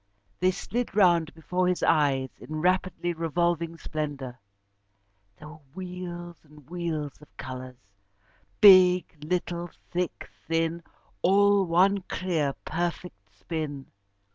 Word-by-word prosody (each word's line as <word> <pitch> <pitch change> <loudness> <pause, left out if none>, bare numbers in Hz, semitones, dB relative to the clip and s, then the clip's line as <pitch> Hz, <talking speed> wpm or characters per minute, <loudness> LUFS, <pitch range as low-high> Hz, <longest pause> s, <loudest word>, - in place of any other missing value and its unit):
They 185 - +3
slid 230 +4 -3
round 170 -5 +4
before 180 +3 -1
his 180 -1 0
eyes 135 -3 +2
in 155 - -7
rapidly 180 -1 0
revolving 170 0 -1
splendour. 145 -6 -5 1.0
There 150 - -11
were 155 +1 -12 0.2
wheels 180 -2 -7
and 150 -3 -18
wheels 160 -4 -4
of 150 - -19
colours 130 -1 -7 0.8
big, 185 -3 +7
little, 175 +1 -2 0.2
thick, 180 0 -3 0.2
thin 165 +1 0 0.4
all 200 +1 +4
one 190 +4 +3
clear, 160 -7 -1
perfect 165 - -4
spin. 140 - -5
170 Hz, 110 wpm, -27 LUFS, 150-180 Hz, 1.0 s, big